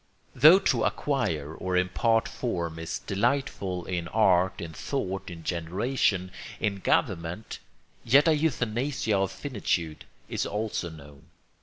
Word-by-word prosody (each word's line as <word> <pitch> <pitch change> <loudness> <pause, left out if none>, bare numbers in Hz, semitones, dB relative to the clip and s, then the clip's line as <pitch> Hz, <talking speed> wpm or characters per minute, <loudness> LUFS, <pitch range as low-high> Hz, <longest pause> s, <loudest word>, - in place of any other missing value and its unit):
Though 160 +5 +8
to 120 - +1
acquire 80 - -1
or 90 +2 -2
impart 115 +5 +2
form 85 -9 -3
is 80 - -3
delightful 100 -5 -1
in 90 -2 -3
art, 95 -3 +3
in 80 -1 -6
thought, 95 - -3
in 85 -2 -9
generation, 95 +3 0 0.3
in 105 -3 -1
government, 90 +3 -1 0.4
yet 140 +7 +5
a 160 - +5
euthanasia 125 -5 0
of 95 -1 +1
finitude 85 - -3 0.2
is - - -2
also 105 -4 -2
known. 75 -3 -13
95 Hz, 125 wpm, -27 LUFS, 85-120 Hz, 0.4 s, Though